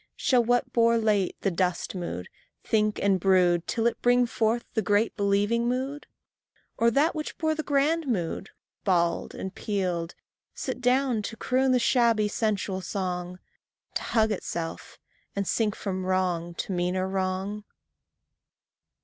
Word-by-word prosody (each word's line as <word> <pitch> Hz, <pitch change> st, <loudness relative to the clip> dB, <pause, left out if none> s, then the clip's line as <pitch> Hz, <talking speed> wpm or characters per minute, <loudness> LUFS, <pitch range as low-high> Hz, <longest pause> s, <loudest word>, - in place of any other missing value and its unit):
Shall 250 Hz, -2 st, +3 dB
what 245 Hz, +2 st, +1 dB
bore 230 Hz, 0 st, +4 dB
late 210 Hz, -4 st, +1 dB
the 195 Hz, -, +1 dB
dust 180 Hz, 0 st, -1 dB
mood, 170 Hz, -, -5 dB, 0.4 s
think 215 Hz, -1 st, +1 dB
and 195 Hz, -2 st, +2 dB
brood 180 Hz, -2 st, +3 dB
Till 225 Hz, -, -1 dB
it 235 Hz, -, 0 dB
bring 245 Hz, 0 st, +4 dB
forth 230 Hz, 0 st, 0 dB
the 220 Hz, -, +1 dB
great 205 Hz, +3 st, +1 dB
believing 205 Hz, +3 st, +1 dB
mood? 265 Hz, +4 st, -3 dB, 0.7 s
Or 230 Hz, -, +3 dB
that 285 Hz, +8 st, +2 dB
which 305 Hz, -1 st, -5 dB
bore 315 Hz, -1 st, +1 dB
the 310 Hz, -, -2 dB
grand 300 Hz, +2 st, +1 dB
mood, 195 Hz, -4 st, -2 dB, 0.3 s
bald 170 Hz, -3 st, +1 dB
and 190 Hz, -, -5 dB
peeled, 180 Hz, -5 st, -2 dB, 0.4 s
Sit 255 Hz, -1 st, -4 dB
down 250 Hz, -2 st, +2 dB
to 225 Hz, +2 st, -6 dB
croon 260 Hz, +3 st, +1 dB
the 255 Hz, -, +4 dB
shabby 235 Hz, -3 st, +3 dB
sensual 200 Hz, -3 st, -1 dB
song, 180 Hz, -2 st, -3 dB, 0.6 s
To -, -, -1 dB
hug 220 Hz, -1 st, +1 dB
itself, 170 Hz, -4 st, -5 dB, 0.4 s
and 200 Hz, -1 st, -1 dB
sink 215 Hz, -2 st, +1 dB
from 190 Hz, -2 st, -3 dB
wrong 180 Hz, -2 st, -1 dB
to -, -, -4 dB
meaner 180 Hz, +1 st, 0 dB
wrong? 190 Hz, +2 st, -2 dB
210 Hz, 145 wpm, -27 LUFS, 185-240 Hz, 0.7 s, bore